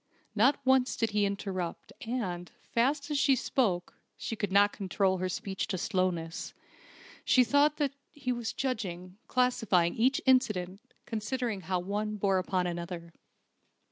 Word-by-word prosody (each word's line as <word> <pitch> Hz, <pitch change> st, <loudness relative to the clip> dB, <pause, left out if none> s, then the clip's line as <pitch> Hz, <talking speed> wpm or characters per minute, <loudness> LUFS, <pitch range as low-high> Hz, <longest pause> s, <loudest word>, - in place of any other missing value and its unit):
Not 245 Hz, +7 st, +4 dB
once 260 Hz, -1 st, +3 dB
did 225 Hz, -2 st, 0 dB
he 210 Hz, 0 st, +2 dB
interrupt, 190 Hz, -3 st, -4 dB
and, 185 Hz, -8 st, -3 dB
fast 280 Hz, +5 st, 0 dB
as 290 Hz, -, +1 dB
she 275 Hz, -1 st, +4 dB
spoke 205 Hz, -8 st, 0 dB, 0.2 s
(she 225 Hz, -, -4 dB
could 205 Hz, -3 st, -3 dB
not 205 Hz, +1 st, +5 dB
control 190 Hz, -1 st, 0 dB
her 185 Hz, 0 st, -1 dB
speech 190 Hz, +1 st, -3 dB
to 185 Hz, -, -2 dB
slowness), 180 Hz, -4 st, -2 dB, 0.7 s
she 255 Hz, -, +5 dB
thought 285 Hz, +5 st, +3 dB
that 285 Hz, -3 st, 0 dB, 0.2 s
he 280 Hz, -4 st, -3 dB
was 240 Hz, -2 st, -2 dB
judging, 185 Hz, -8 st, -4 dB
classifying 225 Hz, -9 st, +2 dB
each 255 Hz, +4 st, +2 dB
incident, 210 Hz, -8 st, +2 dB, 0.2 s
considering 225 Hz, -1 st, -2 dB
how 185 Hz, +1 st, -1 dB
one 205 Hz, +3 st, -2 dB
bore 195 Hz, -2 st, +2 dB
upon 185 Hz, 0 st, 0 dB
another. 170 Hz, -1 st, -5 dB
205 Hz, 140 wpm, -30 LUFS, 185-250 Hz, 0.7 s, not